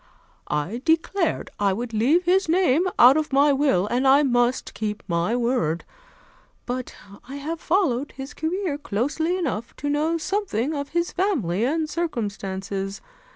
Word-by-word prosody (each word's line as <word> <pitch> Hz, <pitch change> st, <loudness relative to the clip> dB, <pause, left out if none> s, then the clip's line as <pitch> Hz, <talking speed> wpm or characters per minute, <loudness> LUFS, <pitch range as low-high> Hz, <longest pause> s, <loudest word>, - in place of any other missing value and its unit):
"I 155 Hz, -, -2 dB
declared 325 Hz, -1 st, 0 dB
I 200 Hz, -1 st, +2 dB
would 230 Hz, +3 st, -5 dB
leave 270 Hz, +12 st, +3 dB
his 365 Hz, 0 st, +2 dB
name 350 Hz, -1 st, +3 dB
out 255 Hz, +4 st, +8 dB
of 310 Hz, -2 st, -1 dB
my 280 Hz, +1 st, +4 dB
will, 270 Hz, -10 st, +2 dB
and 245 Hz, +5 st, 0 dB
I 275 Hz, +2 st, +6 dB
must 245 Hz, -1 st, +1 dB
keep 210 Hz, -1 st, -4 dB
my 170 Hz, +5 st, 0 dB
word; 235 Hz, -10 st, 0 dB, 0.8 s
but 250 Hz, 0 st, -4 dB, 0.3 s
I 275 Hz, -, -6 dB
have 310 Hz, +4 st, -4 dB
followed 295 Hz, -8 st, 0 dB
his 270 Hz, +1 st, -8 dB
career 325 Hz, -2 st, -2 dB
closely 290 Hz, -, -1 dB
enough 250 Hz, -10 st, -3 dB
to 290 Hz, -, -4 dB
know 310 Hz, +3 st, +1 dB
something 325 Hz, -, -1 dB
of 285 Hz, -1 st, -4 dB
his 340 Hz, +2 st, -1 dB
family 235 Hz, -, 0 dB
and 310 Hz, +4 st, 0 dB
circumstances. 200 Hz, -, -3 dB
275 Hz, 150 wpm, -24 LUFS, 225-325 Hz, 0.8 s, out